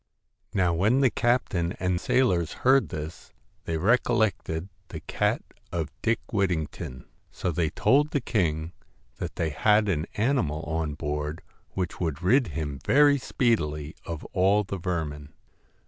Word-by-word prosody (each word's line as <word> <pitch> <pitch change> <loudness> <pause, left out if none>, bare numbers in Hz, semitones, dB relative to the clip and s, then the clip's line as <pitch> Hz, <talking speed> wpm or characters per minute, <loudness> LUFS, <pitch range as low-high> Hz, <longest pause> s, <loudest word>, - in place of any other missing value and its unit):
' - - -52
Now 90 -3 +3
when 105 +10 +3
the 130 -3 +4
captain 100 -8 +1
and 90 -1 0
sailors 110 -11 +2
heard 135 +1 +5
this, 75 +2 -7 0.3
they 80 - -1
recollected 105 -4 +1 0.2
the - - -7
cat - - 0 0.3
of 80 -3 -2
Dick 115 0 +1
Whittington; 80 - -2 0.2
so 90 - -3
they 80 0 0
told 140 - +3
the 150 - 0
king 85 - -1 0.5
that - - -5
they 80 -2 -1
had 105 +6 +3
an 80 -5 0
animal 105 - 0
on 80 -1 -2
board 75 +2 -3 0.3
which 90 -2 -3
would 85 -1 -2
rid 120 +6 +4
him 75 -3 -4
very 145 0 +5
speedily 75 - 0
of 85 -2 -6
all 100 +3 +3
the 100 -1 -5
vermin. 75 -5 -3
90 Hz, 145 wpm, -27 LUFS, 80-115 Hz, 0.5 s, heard